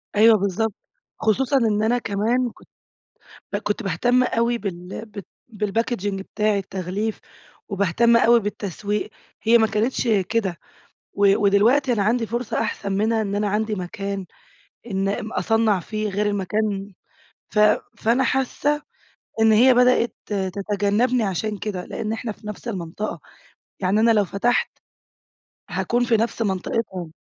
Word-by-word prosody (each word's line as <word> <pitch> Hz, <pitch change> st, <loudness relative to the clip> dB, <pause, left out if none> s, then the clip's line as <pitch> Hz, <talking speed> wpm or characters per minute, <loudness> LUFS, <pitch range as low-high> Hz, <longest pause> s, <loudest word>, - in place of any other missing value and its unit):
أيوه 220 Hz, +1 st, +7 dB
بالضبط. 200 Hz, +2 st, -1 dB, 0.5 s
خصوصًا 260 Hz, +5 st, +2 dB
إن 215 Hz, -3 st, +2 dB
أنا 240 Hz, +2 st, +2 dB
كمان 230 Hz, +3 st, 0 dB
كت -, -, -20 dB, 0.9 s
ب -, -, +1 dB
كنت 210 Hz, +2 st, -2 dB
باهتم 245 Hz, +8 st, +2 dB
أوي 235 Hz, -1 st, +1 dB
بال 185 Hz, +1 st, -6 dB
بت 205 Hz, -2 st, -9 dB, 0.3 s
بالPackaging 210 Hz, 0 st, -1 dB
بتاعي 205 Hz, +2 st, -1 dB
التغليف 195 Hz, +3 st, -3 dB, 0.5 s
وباهتم 205 Hz, +4 st, +3 dB
أوي 235 Hz, 0 st, +5 dB
بالتسويق، 205 Hz, +1 st, -3 dB, 0.3 s
هي 235 Hz, +1 st, +5 dB
ما 220 Hz, -, +4 dB
كانتش 225 Hz, +4 st, -1 dB, 0.2 s
كده. 200 Hz, -7 st, 0 dB, 0.6 s
و 200 Hz, -1 st, +4 dB
ودلوقتي 240 Hz, +7 st, +4 dB
أنا 205 Hz, -3 st, +1 dB
عندي 230 Hz, +2 st, +1 dB
فرصة 235 Hz, 0 st, -2 dB
أحسن 205 Hz, -2 st, -3 dB
منها 220 Hz, +3 st, +1 dB
إن 200 Hz, -1 st, -2 dB
أنا 205 Hz, 0 st, 0 dB
عندي 215 Hz, +1 st, 0 dB
مكان 195 Hz, +1 st, -4 dB, 0.7 s
إن 195 Hz, +1 st, 0 dB
ام 220 Hz, +2 st, -3 dB
أصنّع 225 Hz, -3 st, +2 dB
فيه 215 Hz, +3 st, -3 dB
غير 205 Hz, +2 st, -1 dB
المكان 205 Hz, 0 st, -1 dB, 0.6 s
ف 210 Hz, -, -1 dB, 0.4 s
فأنا 240 Hz, +4 st, +2 dB
حاسّة 280 Hz, +3 st, 0 dB, 0.6 s
إن 220 Hz, 0 st, +6 dB
هي 250 Hz, +4 st, +6 dB
بدأت 250 Hz, -1 st, +3 dB
تتجنّبني 205 Hz, +4 st, 0 dB
عشان 205 Hz, +2 st, -2 dB
كده، 195 Hz, -4 st, -4 dB
لإن 215 Hz, 0 st, -4 dB
إحنا 225 Hz, 0 st, -4 dB
في 210 Hz, -, -12 dB
نفس 210 Hz, +3 st, -7 dB
المنطقة. 190 Hz, 0 st, -4 dB, 0.6 s
يعني 195 Hz, +3 st, +1 dB
أنا 230 Hz, +1 st, +5 dB
لو 210 Hz, -3 st, +3 dB
فتحت 200 Hz, +7 st, +1 dB, 1.0 s
هاكون 240 Hz, +1 st, 0 dB
في 230 Hz, -2 st, +3 dB
نفس 230 Hz, +1 st, -1 dB
منطقتهم. 190 Hz, -3 st, -2 dB
215 Hz, 135 wpm, -22 LUFS, 200-230 Hz, 1.0 s, أيوه